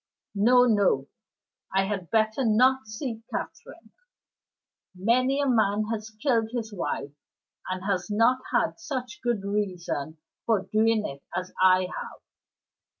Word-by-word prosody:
No, 245 +5 +5
no; 200 - +2 0.7
I 195 - +4
had 195 -4 -4
better 220 +3 +1
not 255 +2 +3
see 225 +1 -5
Catherine. - - -7 1.0
Many 255 +8 +2
a 285 - +1
man 215 -3 +2
has 215 0 -5
killed 225 0 0
his 225 -3 -4
wife, 145 -6 -3 0.6
and 185 0 -3
has 195 -1 -1
not 230 +5 +3
had - - +1
such 255 -7 -5
good 240 -5 -1
reason 180 -7 -3 0.3
for 220 -4 +2
doing 215 +2 +2
it 140 0 -6
as 185 0 -4
I 185 0 +6
have. 180 0 -6
215 Hz, 130 wpm, -26 LUFS, 190-240 Hz, 1.0 s, I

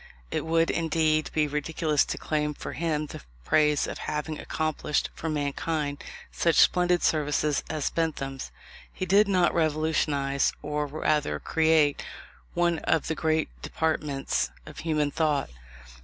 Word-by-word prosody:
It - - -2
would, 165 0 +3
indeed, 160 -1 +1
be 155 -1 +1
ridiculous 150 +1 +1
to - - -4
claim 150 -1 -1
for - - -6
him 155 -2 -1
the - - -9 0.2
praise 150 - +3
of - - -6
having 150 0 -3
accomplished 155 -1 -1
for 160 - -4
mankind 145 0 -2 0.3
such 170 -1 +1
splendid 180 -1 +4
services 150 -1 +1
as 155 -2 -1
Bentham's. 135 -5 -2 0.4
He 185 - -4
did 200 +3 +5
not 180 -3 +3
revolutionize, 150 -3 +1
or 150 0 -2
rather 145 - 0
create, 160 - +2 0.5
one 170 -1 +2
of 160 - 0
the - - +1
great 155 -1 +1
departments 150 -4 -1 0.2
of 155 - -10
human 150 -3 0
thought. 150 - 0
155 Hz, 135 wpm, -27 LUFS, 150-160 Hz, 0.5 s, did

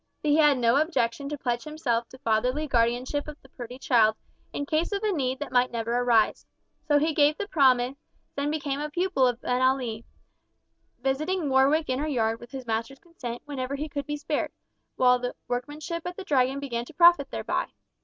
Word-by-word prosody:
But 300 - 0
he 295 - +4
had 295 -3 +5
no 235 +1 +3
objection 280 -4 0
to 295 - -4
pledge 240 -3 -2
himself 255 -7 -2
to 260 - -13
fatherly 255 +4 0
guardianship 250 +3 0
of 300 0 -9
the 265 - -18
pretty 245 -1 -9
child 225 -4 +3 0.4
in 285 - -3
case 310 +5 0
of 400 +1 -2
a 425 - +2
need 265 -7 -1
that 290 -1 -6
might 250 0 +3
never 230 0 -2
arise. 240 -3 +2 0.4
So 295 -1 +4
he 310 +2 +1
gave 295 +1 +3
the 410 - -4
promise, 260 -5 +3 0.4
and 285 +1 -1
became 285 -2 -2
a 300 +1 -3
pupil 345 -5 +1
of 245 -1 -1
Abenali, 250 -3 0 1.0
visiting 310 +5 0
Warwick 275 +4 +3
Inner 260 +4 -1
Yard 225 -5 0
with 240 - -12
his 260 -1 -7
master's 230 +4 -3
consent 250 -8 -8
whenever 275 -2 -4
he 295 +2 -4
could 285 -1 -5
be 295 0 -2
spared, 295 0 -2 0.5
while 250 -1 +4
the 245 0 -4
workmanship 295 +7 -4
at 355 - -6
the 390 - -6
Dragon 270 -5 +1
began 240 -4 -3
to 315 - -15
profit 345 -3 +6
thereby. - - -2
270 Hz, 195 wpm, -26 LUFS, 245-300 Hz, 1.0 s, profit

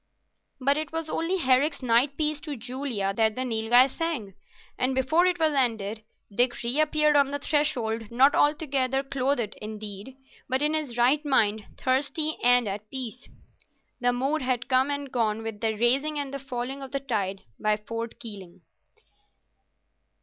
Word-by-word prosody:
But 280 +2 +2
it 310 0 -3
was 325 -1 -4
only 340 +4 -1
Herrick's 275 -1 +2
Nightpiece 285 +5 +1
to 295 -3 -5
Julia 245 -5 -3
that 220 0 +2
the 255 - -2
Nilghai 235 +1 +4
sang, 275 - -4 0.4
and 255 +1 0
before 315 +7 +3
it 360 -1 0
was 315 -2 +2
ended 220 -5 -1 0.3
Dick 245 +1 +2
reappeared 300 +4 +2
on 280 -1 +4
the 285 - -2
threshold, 245 -7 -1
not 260 +4 +4
altogether 275 -3 +1
clothed 270 -4 -1
indeed, 215 +3 -7 0.3
but 260 +2 +1
in 300 +1 +2
his 295 -6 -3
right 260 +5 +3
mind, 220 -7 +2
thirsty 285 +4 +1
and 245 -1 +5
at 205 +2 -5
peace. 250 -2 -6 0.7
The 245 0 +2
mood 270 +6 -1
had 255 -2 -1
come 260 +1 +3
and 285 -2 -3
gone 225 -2 0
with 220 -2 -6
the 220 -1 +1
rising 275 +7 +3
and 280 -1 -4
the 275 - -4
falling 265 0 -5
of 270 -1 -9
the 275 - 0
tide 205 -8 -3 0.2
by 215 0 +1
Fort 230 +2 -6
Keeling. 200 -8 -9
255 Hz, 155 wpm, -26 LUFS, 225-285 Hz, 0.7 s, and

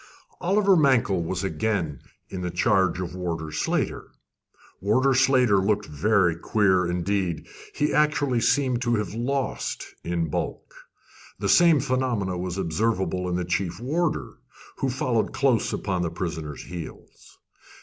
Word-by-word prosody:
Oliver 195 +2 +3
Mankell 130 - +3
was 95 +3 -3
again 95 -7 -2 0.3
in 95 - -6
the 90 - -2
charge 90 +1 +2
of 90 -2 -4
Warder 85 -4 -4
Slater. 75 - -1 0.7
Warder 130 +7 +2
Slater 130 -5 +4
looked 105 +2 +1
very 90 +3 +2
queer 95 0 +2
indeed 90 -1 -1 0.3
he 150 - 0
actually 145 -4 +2
seemed 130 0 +2
to 120 -2 +1
have 105 -4 -2
lost 130 +4 -2 0.2
in 85 -1 -1
bulk. - - -4 0.6
The - - -2
same 170 -4 +6
phenomenon 125 -9 -1
was 90 0 -4
observable 95 0 -1
in 90 - -1
the 90 0 -1
chief 90 0 -2
warder, 155 +7 -2 0.4
who 135 - -1
followed 125 -3 0
close 130 -5 +2
upon 95 -3 -2
the 85 - -1
prisoner's 80 -4 -5
heels. 85 -3 -10
100 Hz, 135 wpm, -25 LUFS, 90-130 Hz, 0.7 s, same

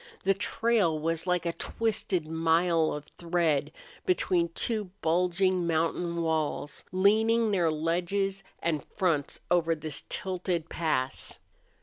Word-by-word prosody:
The 195 - +4
trail 200 -4 +1
was 165 +3 -1
like 180 -1 +1
a 170 - 0
twisted 190 -3 -1
mile 165 0 +2
of 150 0 -5
thread 170 -4 +1 0.3
between 180 - +2
two 220 -3 0 0.2
bulging 180 +2 +2
mountain 170 +1 0
walls 155 -2 -1
leaning 220 +4 +3
their 175 -5 +2
ledges 180 +5 -1 0.2
and 155 -4 0
fronts 165 -8 0
over 165 -2 +3
this 155 -2 -4
tilted 180 -3 -1
pass. 135 -6 -2
170 Hz, 115 wpm, -29 LUFS, 160-190 Hz, 0.3 s, The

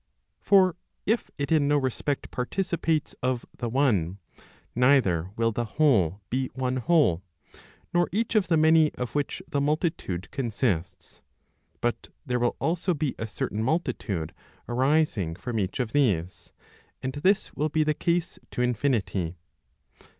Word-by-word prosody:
For 185 -3 +4 0.3
if 225 +2 +1
it 140 0 -3
in 150 -3 +4
no 145 0 +3
respect 135 +1 -2
participates 165 +3 -1
of 125 -1 -1
the 120 - -3
one, 105 - +1 0.6
neither 120 - +3
will 115 0 +1
the 120 +2 -2
whole 105 - +3
be 130 +1 0
one 130 -1 -1
whole, 135 - +3 0.7
nor 175 0 +3
each 225 +4 0
of 210 -5 +3
the 165 -2 +3
many 160 0 +5
of 125 -2 -4
which 145 -1 -2
the 140 - -1
multitude 150 - -1
consists; 110 - -2 0.6
but 120 0 -1 0.2
there 125 -3 0
will 120 0 +1
also 175 +2 0
be 145 -2 -1
a 110 - -3
certain 105 0 -3
multitude 110 - -1 0.3
arising 125 - +1
from 115 +4 -3
each 95 +5 -2
of 120 -3 -1
these, 95 - 0 0.5
and 130 0 -2
this 185 +8 +1
will 155 +1 -1
be 155 +1 +2
the 155 0 +1
case 170 +3 -1
to 125 - -1
infinity. 110 -8 0
130 Hz, 145 wpm, -27 LUFS, 110-155 Hz, 0.7 s, many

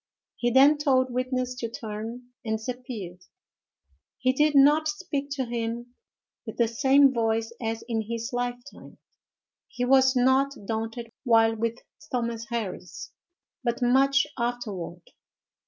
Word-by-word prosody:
He 240 - 0
then 275 +4 +6
told 260 -3 +2
witness 255 0 -1
to 230 - -3
turn, 225 +2 -7
and 220 -2 -1
disappeared. 220 -6 -7 1.0
He 255 0 +1
did 300 +2 +2
not 295 +3 +6
speak 300 -3 -3
to 265 -2 -2
him 235 +1 -4 0.5
with - - -8
the 235 - +3
same 270 +3 +4
voice 225 -1 0
as 225 0 -3
in 225 -2 -1
his 230 +1 -4
lifetime. 245 +2 -5 0.7
He 245 - -3
was 265 +1 +5
not 265 +2 +3
daunted 225 +2 -4
while 225 -3 +4
with 230 +1 -2 0.3
Thomas 235 -2 -2
Harris, 210 -6 -5 0.5
but 240 0 -1
much 275 +3 +4
afterward. 210 -8 -4
245 Hz, 125 wpm, -26 LUFS, 225-265 Hz, 1.0 s, then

